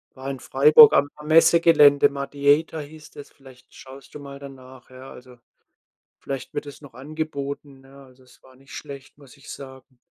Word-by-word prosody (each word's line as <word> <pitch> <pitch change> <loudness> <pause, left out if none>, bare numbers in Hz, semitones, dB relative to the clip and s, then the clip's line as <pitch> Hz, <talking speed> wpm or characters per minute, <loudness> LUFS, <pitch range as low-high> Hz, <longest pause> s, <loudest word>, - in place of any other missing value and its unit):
war 135 +1 -9
in 135 -2 -7
Freiburg 150 - +5
am 145 +1 +1
am 150 0 -14
Messegelände, 160 -3 +4
Mudiator 145 +3 -1
hieß 150 +1 -14
das, 145 - -14
vielleicht 130 -3 -20
schaust 135 +1 -16
du 150 - -10
mal 140 -1 -11
danach, 130 -2 -15
ja. 130 +1 -14
Also, 125 -1 -16 0.8
vielleicht 135 -2 -8
wird 145 - -6
das 145 +1 -13
noch 140 - -15
angeboten, 140 -1 -8
ne? 135 +1 -18
Also, 130 0 -22
es 125 - -24
war 130 0 -21
nicht 135 +1 -17
schlecht, 140 -2 -12
muss 140 -1 -19
ich 140 - -15
sagen. 130 -1 -13
140 Hz, 180 wpm, -21 LUFS, 130-145 Hz, 0.8 s, Freiburg